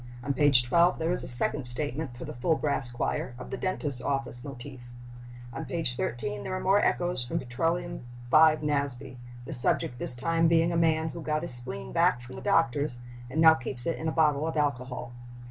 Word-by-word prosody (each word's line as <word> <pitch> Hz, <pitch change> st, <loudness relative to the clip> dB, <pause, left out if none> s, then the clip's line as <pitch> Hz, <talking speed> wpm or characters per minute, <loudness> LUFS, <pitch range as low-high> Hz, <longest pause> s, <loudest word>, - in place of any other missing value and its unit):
On 140 Hz, -, -2 dB
page 140 Hz, -3 st, +5 dB
12 170 Hz, +8 st, +3 dB
there 165 Hz, +1 st, -2 dB
is -, -, -4 dB
a -, -, -6 dB
second 130 Hz, +3 st, +7 dB
statement, 130 Hz, +1 st, -4 dB
for -, -, -8 dB
the -, -, -7 dB
full 145 Hz, +7 st, 0 dB
brass 140 Hz, -4 st, -2 dB
choir, 120 Hz, 0 st, -4 dB
of 125 Hz, -, -10 dB
the -, -, -3 dB
dentist's 145 Hz, -9 st, -1 dB
office 135 Hz, -3 st, -3 dB
motif. 130 Hz, -1 st, -10 dB, 0.7 s
On -, -, -6 dB
page 165 Hz, -8 st, -3 dB
13 105 Hz, -4 st, -4 dB
there 185 Hz, -, -5 dB
are -, -, -3 dB
more 195 Hz, +2 st, +2 dB
echoes 175 Hz, -7 st, 0 dB
from 120 Hz, -, -4 dB
Petroleum 165 Hz, +8 st, -3 dB, 0.3 s
V. 155 Hz, -1 st, +5 dB
Nasby, 140 Hz, -3 st, -3 dB, 0.3 s
the 160 Hz, -, -6 dB
subject 120 Hz, -1 st, -1 dB
this 125 Hz, -, +1 dB
time 165 Hz, +6 st, +1 dB
being 165 Hz, +1 st, +2 dB
a -, -, -2 dB
man 160 Hz, -1 st, +1 dB
"who 170 Hz, -, -8 dB
got 155 Hz, 0 st, -2 dB
his 170 Hz, -, +4 dB
spleen 65 Hz, -, +3 dB
back 115 Hz, -, +2 dB
from 120 Hz, +1 st, -12 dB
the -, -, -9 dB
doctor's 145 Hz, -4 st, 0 dB, 0.3 s
and 145 Hz, +5 st, -4 dB
now 160 Hz, 0 st, +7 dB
keeps 130 Hz, -4 st, -5 dB
it 165 Hz, -, -2 dB
in 160 Hz, -, -4 dB
a -, -, 0 dB
bottle 155 Hz, -1 st, +1 dB
of 160 Hz, -, -4 dB
alcohol." 125 Hz, -4 st, -3 dB
145 Hz, 205 wpm, -27 LUFS, 125-160 Hz, 0.7 s, second